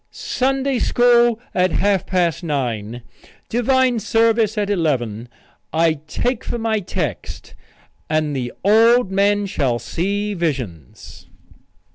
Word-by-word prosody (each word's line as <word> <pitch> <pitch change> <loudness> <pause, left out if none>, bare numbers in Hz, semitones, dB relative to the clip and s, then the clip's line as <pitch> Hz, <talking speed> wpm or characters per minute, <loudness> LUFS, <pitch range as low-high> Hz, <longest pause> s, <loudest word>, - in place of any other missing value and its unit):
Sunday 270 0 -1
school 240 -1 +3
at 185 0 +1
half 200 -2 +1
past 175 -3 0
nine; 120 -7 -3 0.5
divine 250 0 +2
service 225 0 +1
at 205 -1 0
eleven. 125 - -1 0.4
I 160 -2 +1
take 245 +8 -2
for 240 - -3
my 225 -1 0
text 170 - -5 0.6
'And 155 -2 0
the 125 -2 -3
old 225 +2 +4
men 205 +1 +2
shall 135 -10 -1
see 200 - -2
visions.'" 125 - -5
195 Hz, 110 wpm, -20 LUFS, 145-230 Hz, 0.6 s, old